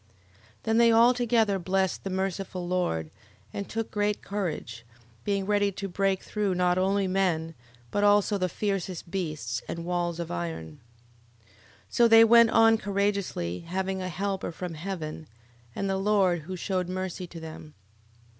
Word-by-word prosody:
11:9. 105 Hz, -, -34 dB, 0.6 s
Then 225 Hz, 0 st, +1 dB
they 235 Hz, -1 st, +6 dB
all 230 Hz, +2 st, +6 dB
together 225 Hz, -5 st, +2 dB
blessed 190 Hz, +1 st, 0 dB
the 195 Hz, -, -3 dB
merciful 190 Hz, -1 st, -3 dB
Lord, 130 Hz, -, -1 dB, 0.4 s
and 200 Hz, -, -5 dB
took 225 Hz, 0 st, -3 dB
great 210 Hz, 0 st, -1 dB
courage: 155 Hz, -, -4 dB, 0.4 s
being 200 Hz, -1 st, 0 dB
ready 205 Hz, 0 st, +2 dB
to 195 Hz, +1 st, -4 dB
break 195 Hz, +1 st, 0 dB
through 205 Hz, -3 st, -1 dB
not 180 Hz, 0 st, +2 dB
only 195 Hz, +1 st, +1 dB
men, 175 Hz, -4 st, 0 dB, 0.4 s
but 205 Hz, -, 0 dB
also 205 Hz, 0 st, +4 dB
the 185 Hz, 0 st, 0 dB
fiercest 190 Hz, -4 st, -3 dB
beasts, 165 Hz, -6 st, -3 dB
and 170 Hz, 0 st, -5 dB
walls 175 Hz, -1 st, -1 dB
of 170 Hz, -, -4 dB
iron. 80 Hz, -2 st, -5 dB, 0.6 s
11:10. -, -, -31 dB, 0.4 s
So 235 Hz, -, +4 dB
they 225 Hz, 0 st, +8 dB
went 235 Hz, 0 st, +7 dB
on 225 Hz, 0 st, +5 dB
courageously, 200 Hz, -, -1 dB
having 190 Hz, +2 st, -3 dB
a 185 Hz, -, -3 dB
helper 195 Hz, +1 st, -3 dB
from 175 Hz, +1 st, -6 dB
heaven, 160 Hz, -2 st, -6 dB, 0.5 s
and 195 Hz, -, -2 dB
the 195 Hz, 0 st, 0 dB
Lord, 195 Hz, -4 st, +2 dB
who 185 Hz, -, -3 dB
shewed 180 Hz, 0 st, -2 dB
mercy 185 Hz, -1 st, -4 dB
to 170 Hz, -1 st, -10 dB
them. 155 Hz, -1 st, -10 dB
190 Hz, 160 wpm, -27 LUFS, 175-205 Hz, 0.6 s, they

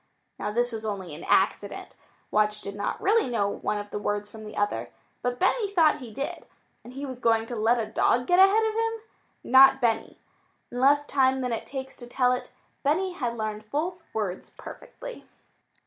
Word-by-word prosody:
Now, 210 Hz, -, -2 dB
this 240 Hz, +2 st, +1 dB
was 220 Hz, -1 st, -5 dB
only 195 Hz, -6 st, -4 dB
an 155 Hz, -, -9 dB
accident. -, -, +1 dB, 0.4 s
Watch 210 Hz, 0 st, +2 dB
did 200 Hz, -, -6 dB
not 205 Hz, 0 st, -3 dB
really 430 Hz, -, +2 dB
know 215 Hz, -4 st, +1 dB
one 205 Hz, +1 st, -2 dB
of 205 Hz, 0 st, -6 dB
the -, -, -3 dB
words 205 Hz, 0 st, -2 dB
from 220 Hz, -1 st, -10 dB
the 210 Hz, -, -9 dB
other. 120 Hz, -, -1 dB, 0.3 s
But 245 Hz, 0 st, -1 dB
Benny 410 Hz, -, +2 dB
thought 330 Hz, -6 st, +4 dB
he 250 Hz, -5 st, -9 dB
did. 275 Hz, +5 st, -5 dB, 0.4 s
And 245 Hz, +2 st, -12 dB
was 260 Hz, -2 st, -6 dB
he -, -, -21 dB
going 225 Hz, -1 st, +3 dB
to 240 Hz, -, -6 dB
let 225 Hz, +2 st, +3 dB
a 230 Hz, -, -1 dB
dog 240 Hz, +3 st, +1 dB
get 355 Hz, +5 st, +3 dB
ahead 395 Hz, +4 st, +6 dB
of 440 Hz, 0 st, 0 dB
him? 455 Hz, +1 st, 0 dB, 0.5 s
Not 265 Hz, +1 st, +7 dB
Benny! 230 Hz, -3 st, 0 dB, 0.5 s
In 245 Hz, -, -4 dB
less 285 Hz, +3 st, +4 dB
time 265 Hz, -2 st, +2 dB
than 250 Hz, -2 st, -1 dB
it 225 Hz, -, -4 dB
takes 265 Hz, -1 st, -5 dB
to 240 Hz, -, -8 dB
tell 250 Hz, 0 st, +2 dB
it, 250 Hz, -, -3 dB, 0.3 s
Benny 350 Hz, +7 st, +1 dB
had 240 Hz, -7 st, -3 dB
learned 215 Hz, -1 st, -4 dB
both 340 Hz, +6 st, -2 dB
words 200 Hz, -4 st, -3 dB
perfectly. -, -, -10 dB
245 Hz, 195 wpm, -26 LUFS, 215-285 Hz, 0.5 s, Not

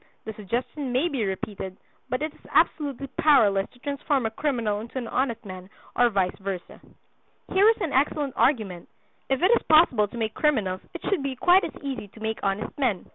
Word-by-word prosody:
The 220 Hz, -, -5 dB
suggestion 245 Hz, +6 st, -4 dB
may 265 Hz, +8 st, +1 dB
be 255 Hz, -8 st, -1 dB
repeated; 190 Hz, -1 st, -5 dB, 0.3 s
but 255 Hz, +4 st, -1 dB
it 310 Hz, -, -3 dB
is -, -, -22 dB
absolutely 280 Hz, -3 st, +1 dB
powerless 215 Hz, -10 st, +4 dB
to -, -, -22 dB
transform 280 Hz, -1 st, -1 dB
a 220 Hz, -, -1 dB
criminal 230 Hz, -6 st, -1 dB
into 230 Hz, +4 st, -8 dB
an 245 Hz, -3 st, -3 dB
honest 240 Hz, -2 st, -1 dB
man, 185 Hz, -1 st, -9 dB, 0.3 s
or 245 Hz, -1 st, +4 dB
vice 190 Hz, -4 st, 0 dB
versa." 195 Hz, -2 st, -6 dB, 0.7 s
Here 400 Hz, +3 st, +6 dB
is 450 Hz, -, +3 dB
an 335 Hz, -7 st, -2 dB
excellent 280 Hz, 0 st, +1 dB
argument. 210 Hz, -, 0 dB, 0.4 s
If 270 Hz, +4 st, 0 dB
it 370 Hz, -, +5 dB
is -, -, 0 dB
possible 310 Hz, -10 st, +5 dB
to 235 Hz, -, -10 dB
make 220 Hz, -1 st, -2 dB
criminals 210 Hz, -12 st, 0 dB
it 345 Hz, -, -6 dB
should 395 Hz, -7 st, +1 dB
be 275 Hz, -1 st, -3 dB
quite 360 Hz, +8 st, +5 dB
as -, -, -7 dB
easy 265 Hz, -7 st, -4 dB
to 210 Hz, -, -17 dB
make 220 Hz, 0 st, -3 dB
honest 195 Hz, +2 st, -2 dB
men. 235 Hz, -9 st, 0 dB
245 Hz, 195 wpm, -25 LUFS, 205-285 Hz, 0.7 s, Here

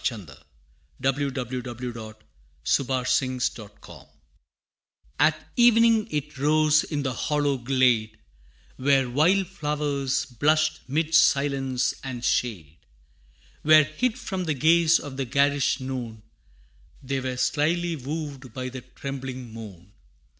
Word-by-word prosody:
[Illustration: 110 Hz, -7 st, -2 dB, 0.7 s
The 135 Hz, +1 st, +2 dB
First 120 Hz, -, -4 dB
Frost 130 Hz, -1 st, 0 dB
of 105 Hz, -2 st, -10 dB, 0.2 s
Autumn] -, -, -13 dB, 1.1 s
At 155 Hz, +2 st, +1 dB
evening 230 Hz, -2 st, +5 dB
it 150 Hz, -2 st, -4 dB
rose 155 Hz, +1 st, +3 dB
in 145 Hz, -3 st, -3 dB
the 130 Hz, -2 st, -2 dB
hollow 145 Hz, 0 st, 0 dB
glade, 120 Hz, -4 st, +1 dB, 0.6 s
Where 135 Hz, 0 st, +2 dB
wild 165 Hz, +10 st, +3 dB
flowers 150 Hz, -6 st, -2 dB
blushed 155 Hz, +5 st, +1 dB
'mid 155 Hz, +3 st, -1 dB
silence 140 Hz, -5 st, +2 dB
and 125 Hz, -2 st, -5 dB
shade; 90 Hz, -12 st, -1 dB, 0.8 s
Where, 155 Hz, 0 st, +7 dB
hid 230 Hz, -, -2 dB
from 190 Hz, -7 st, -4 dB
the 155 Hz, -3 st, -1 dB
gaze 165 Hz, +3 st, +4 dB
of 140 Hz, -3 st, -8 dB
the 135 Hz, -, -1 dB
garish 140 Hz, +1 st, +1 dB
noon, 125 Hz, -5 st, -6 dB, 0.8 s
They 135 Hz, +1 st, -2 dB
were 130 Hz, -1 st, -4 dB
slily 165 Hz, +5 st, 0 dB
wooed 140 Hz, -3 st, -6 dB
by 130 Hz, -1 st, -4 dB
the 130 Hz, 0 st, -8 dB
trembling 130 Hz, -1 st, -7 dB
moon. 100 Hz, -5 st, -11 dB
135 Hz, 115 wpm, -25 LUFS, 125-155 Hz, 1.1 s, Where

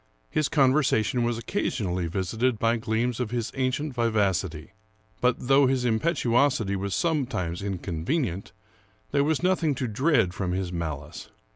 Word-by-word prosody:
His 155 Hz, -, +1 dB
conversation 130 Hz, -5 st, +2 dB
was 120 Hz, -1 st, 0 dB
occasionally 95 Hz, -, -2 dB
visited 110 Hz, +8 st, -1 dB
by 115 Hz, +2 st, +2 dB
gleams 115 Hz, +2 st, -1 dB
of 125 Hz, -4 st, -1 dB
his 120 Hz, -1 st, -2 dB
ancient 135 Hz, +2 st, -1 dB
vivacity; 100 Hz, -9 st, 0 dB, 0.5 s
but, 125 Hz, 0 st, +3 dB
though 135 Hz, +2 st, +4 dB
his 130 Hz, -1 st, +1 dB
impetuosity 120 Hz, -, +2 dB
was 100 Hz, 0 st, -2 dB
sometimes 120 Hz, -, -1 dB
inconvenient, 95 Hz, -, -2 dB, 0.6 s
there 140 Hz, 0 st, +3 dB
was 155 Hz, +3 st, 0 dB
nothing 175 Hz, -5 st, +2 dB
to 130 Hz, -1 st, -2 dB
dread 115 Hz, -, +2 dB
from 90 Hz, -2 st, -2 dB
his 90 Hz, -1 st, -2 dB
malice. 75 Hz, -4 st, -5 dB
115 Hz, 135 wpm, -26 LUFS, 95-135 Hz, 0.6 s, though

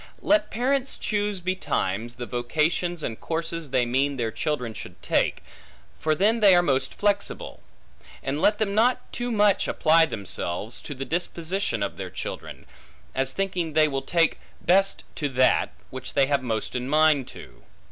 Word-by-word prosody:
Let 310 Hz, 0 st, +3 dB
parents 265 Hz, +3 st, 0 dB
choose 205 Hz, -2 st, -1 dB
betimes, 120 Hz, -, -2 dB
the 120 Hz, -, -5 dB
vocations 155 Hz, +8 st, -1 dB
and 115 Hz, -, -4 dB
courses 165 Hz, -1 st, -3 dB
they 130 Hz, -2 st, +2 dB
mean 135 Hz, +3 st, 0 dB
their 115 Hz, -2 st, -1 dB
children 125 Hz, -4 st, -2 dB
should -, -, -9 dB
take; -, -, +1 dB, 0.6 s
for 155 Hz, 0 st, +1 dB
then 215 Hz, +7 st, +3 dB
they 200 Hz, -4 st, +7 dB
are 175 Hz, -, +5 dB
most 135 Hz, -4 st, 0 dB
flexible; 205 Hz, -1 st, -1 dB, 0.6 s
and 140 Hz, +3 st, -2 dB
let 210 Hz, 0 st, +4 dB
them 205 Hz, -2 st, 0 dB
not 250 Hz, +4 st, +1 dB
too 245 Hz, 0 st, -2 dB
much 205 Hz, -3 st, +3 dB
apply 160 Hz, +1 st, +4 dB
themselves 100 Hz, -, -3 dB
to 145 Hz, -, -7 dB
the 135 Hz, +1 st, -5 dB
disposition 170 Hz, -, -2 dB
of 100 Hz, -, -4 dB
their 95 Hz, -2 st, -5 dB
children, 90 Hz, -, -7 dB, 0.5 s
as 135 Hz, 0 st, 0 dB
thinking 180 Hz, -2 st, -2 dB
they 155 Hz, 0 st, +5 dB
will 135 Hz, -2 st, -2 dB
take 165 Hz, +2 st, +1 dB, 0.2 s
best 195 Hz, +2 st, +3 dB
to 145 Hz, -2 st, -1 dB
that, 130 Hz, -1 st, +3 dB, 0.2 s
which 130 Hz, 0 st, -7 dB
they 140 Hz, -, +5 dB
have 140 Hz, 0 st, +1 dB
most 110 Hz, -4 st, -2 dB
mind 140 Hz, +2 st, +3 dB
to. -, -, -12 dB
155 Hz, 160 wpm, -25 LUFS, 130-195 Hz, 0.6 s, they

